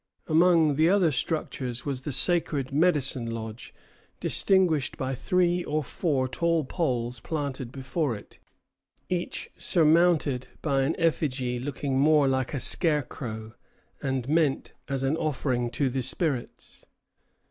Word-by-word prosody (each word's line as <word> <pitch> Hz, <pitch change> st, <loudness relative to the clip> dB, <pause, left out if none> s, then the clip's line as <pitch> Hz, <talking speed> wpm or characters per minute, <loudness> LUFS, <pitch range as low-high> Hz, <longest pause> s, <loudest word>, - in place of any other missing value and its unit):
Among 160 Hz, -3 st, +4 dB
the 160 Hz, +2 st, +4 dB
other 185 Hz, -4 st, +4 dB
structures 130 Hz, -4 st, -3 dB
was 135 Hz, -3 st, -3 dB
the 145 Hz, -, -4 dB
sacred 145 Hz, -3 st, +1 dB
"medicine 140 Hz, -7 st, +2 dB
lodge" 110 Hz, 0 st, -6 dB, 0.5 s
distinguished 180 Hz, -8 st, +2 dB
by 130 Hz, 0 st, -2 dB
three 175 Hz, +5 st, +1 dB
or 155 Hz, -1 st, -1 dB
four 135 Hz, -1 st, -1 dB
tall 165 Hz, +4 st, +1 dB
poles 125 Hz, -7 st, -2 dB
planted 140 Hz, -3 st, -4 dB
before 135 Hz, 0 st, -2 dB
it, 100 Hz, -, -13 dB, 0.7 s
each 180 Hz, -1 st, -3 dB
surmounted 160 Hz, -6 st, +3 dB, 0.2 s
by 140 Hz, -3 st, +1 dB
an 140 Hz, +5 st, 0 dB
effigy 130 Hz, -7 st, 0 dB
looking 135 Hz, 0 st, -2 dB
much 150 Hz, -1 st, +4 dB
like 130 Hz, +2 st, -1 dB
a -, -, -1 dB
scarecrow, 120 Hz, -9 st, 0 dB, 0.5 s
and 130 Hz, -2 st, -2 dB
meant 155 Hz, -2 st, +1 dB
as 135 Hz, -1 st, -2 dB
an 135 Hz, +3 st, +1 dB
offering 130 Hz, -6 st, -1 dB
to 130 Hz, +4 st, 0 dB
the 130 Hz, +1 st, -1 dB
spirits. 130 Hz, 0 st, -3 dB
140 Hz, 125 wpm, -27 LUFS, 130-160 Hz, 0.7 s, Among